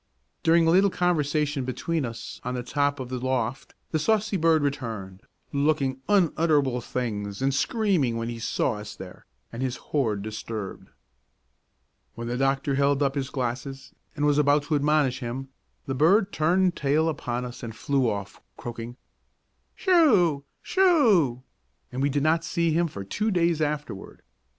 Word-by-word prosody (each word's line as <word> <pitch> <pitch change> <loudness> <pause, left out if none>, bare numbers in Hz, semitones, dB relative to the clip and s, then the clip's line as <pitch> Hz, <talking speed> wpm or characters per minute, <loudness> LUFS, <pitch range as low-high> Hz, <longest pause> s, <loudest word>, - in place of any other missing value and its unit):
During 165 0 +4
a 165 - +4
little 195 +3 +5
conversation 150 -5 0
between 145 +4 -2
us 115 0 -8
on 125 - -3
the 125 - -3
top 145 +2 0
of 130 -2 -5
the 130 -1 -3
loft 130 0 -2 0.2
the 155 - +1
saucy 215 +4 +1
bird 160 -3 +3
returned, 110 -9 -4 0.3
looking 140 -2 +1
unutterable 155 -9 +2
things 105 -5 -4
and 135 +1 +1
screaming 175 - +1
when 115 0 -3
he 120 -1 -5
saw 115 0 -1
us 105 0 -8
there 90 -1 -11 0.3
and 115 - -5
his 130 -1 -1
hoard 110 -9 -1
disturbed. 110 -1 -6 1.3
When 115 0 -5
the 120 - -2
doctor 135 +2 +1
held 140 +1 +2
up 135 -1 +1
his 135 -1 -3
glasses, 130 +1 -4 0.2
and 145 -1 0
was 145 0 +3
about 145 0 +3
to 150 +1 -1
admonish 145 -3 +2
him, 130 +2 -5 0.4
the 135 - -2
bird 190 - +3
turned 180 +3 +2
tail 150 +3 +1
upon 125 -5 -2
us 120 0 -8
and 115 -3 -7
flew 135 -2 +1
off, 100 -3 -5 0.2
croaking 120 +1 -7 0.8
"Sho! 210 - +4 0.2
Sho!" 220 - +3 0.5
and 130 +1 -3
we 140 - +2
did 145 0 0
not 160 +1 +2
see 165 0 0
him 170 +2 +2
for 100 -10 -7
two 210 - -1
days 170 -4 +1
afterward. 150 -9 -4
140 Hz, 160 wpm, -26 LUFS, 125-160 Hz, 1.3 s, little